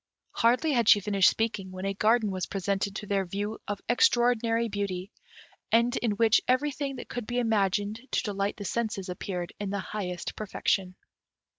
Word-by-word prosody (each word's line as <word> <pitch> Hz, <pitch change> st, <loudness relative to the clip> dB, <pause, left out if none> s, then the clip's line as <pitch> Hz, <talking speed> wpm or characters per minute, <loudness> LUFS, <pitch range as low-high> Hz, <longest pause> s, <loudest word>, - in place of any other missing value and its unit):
Hardly 250 Hz, +7 st, +2 dB
had 235 Hz, -5 st, +3 dB
she 205 Hz, -, +8 dB
finished 200 Hz, -1 st, +4 dB
speaking, 215 Hz, -4 st, -2 dB
when 185 Hz, +1 st, -6 dB
a 195 Hz, -, 0 dB
garden 215 Hz, +1 st, +2 dB
was 185 Hz, -1 st, -3 dB
presented 200 Hz, 0 st, -2 dB
to 210 Hz, -, -5 dB
their 200 Hz, -1 st, 0 dB
view 205 Hz, +4 st, -4 dB
of 205 Hz, -1 st, -3 dB
extraordinary 235 Hz, -1 st, +3 dB
beauty, 200 Hz, -2 st, -3 dB, 0.6 s
and 235 Hz, +2 st, +3 dB
in 230 Hz, -3 st, 0 dB
which 220 Hz, +1 st, +4 dB
everything 275 Hz, +1 st, 0 dB
that 250 Hz, -, -8 dB
could 245 Hz, -3 st, -5 dB
be 245 Hz, -, -2 dB
imagined 210 Hz, -1 st, +1 dB
to -, -, 0 dB
delight 200 Hz, -1 st, -2 dB
the 205 Hz, -, -6 dB
senses 215 Hz, -4 st, -2 dB
appeared 180 Hz, -1 st, -4 dB
in 205 Hz, -1 st, -3 dB
the 200 Hz, -, -2 dB
highest 185 Hz, -3 st, -4 dB
perfection. 195 Hz, -3 st, -1 dB
205 Hz, 170 wpm, -28 LUFS, 195-235 Hz, 0.6 s, she